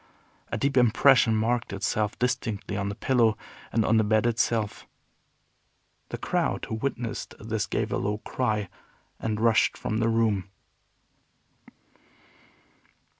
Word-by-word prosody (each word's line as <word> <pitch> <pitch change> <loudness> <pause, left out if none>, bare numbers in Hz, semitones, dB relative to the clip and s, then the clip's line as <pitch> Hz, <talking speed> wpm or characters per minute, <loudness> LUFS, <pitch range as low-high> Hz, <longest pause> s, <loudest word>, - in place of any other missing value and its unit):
A - - -1
deep 140 -1 0
impression 125 0 +5
marked 115 +2 0
itself 100 +2 -1
distinctly 115 -5 -2
on 100 0 -2
the 100 - -5
pillow, 115 -2 +2 0.3
and 115 -2 +1
on 110 - +3
the 110 - +4
bed 110 +1 +2
itself. 115 -2 0 1.2
The - - -4
crowd - - -1
who - - -6
witnessed 115 -1 -4
this 110 -3 -2
gave - - -2
a - - 0
low 105 +1 -1
cry, 110 -3 -2 0.5
and 110 -1 -2
rushed 115 0 +3
from 110 - -2
the 115 0 +2
room. 110 -4 +1
110 Hz, 125 wpm, -26 LUFS, 105-120 Hz, 1.2 s, impression